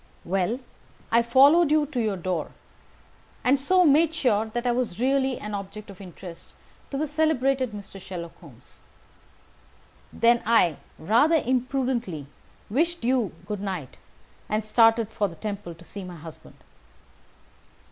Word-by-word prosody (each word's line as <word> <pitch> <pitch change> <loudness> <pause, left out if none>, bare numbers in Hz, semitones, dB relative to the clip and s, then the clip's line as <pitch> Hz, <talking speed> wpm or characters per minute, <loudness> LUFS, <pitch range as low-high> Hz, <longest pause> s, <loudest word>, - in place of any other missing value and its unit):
"Well, 195 +6 0 0.5
I 235 - +5
followed 280 +8 +5
you 305 0 +3
to 270 -4 -3
your 210 -3 -1
door, 175 -3 -3 0.9
and 265 +2 +3
so 365 +6 +3
made 315 +2 +4
sure 225 -7 +1
that 240 +3 -4
I 245 - +3
was 240 -6 -2
really 265 0 +1
an 210 0 -7
object 205 +1 -7
of 195 - -13
interest 175 -2 -11 0.4
to 275 - -4
the 305 - 0
celebrated 275 -4 +1
Mr. 200 -2 -9
Sherlock 175 -3 -7
Holmes. - - -16 1.3
Then 235 0 +3
I, 210 -9 +3 0.2
rather 240 - +3
imprudently, 250 - -1 0.4
wished 335 +8 0
you 240 -6 +1
good 210 -2 -4
night, 185 -10 -5 0.5
and 215 +1 0
started 225 0 +4
for 210 -2 0
the 170 - -10
Temple 200 -1 -6
to 170 - -16
see 200 +3 -8
my 180 -1 -8
husband. 160 0 -12
230 Hz, 140 wpm, -25 LUFS, 195-265 Hz, 1.3 s, I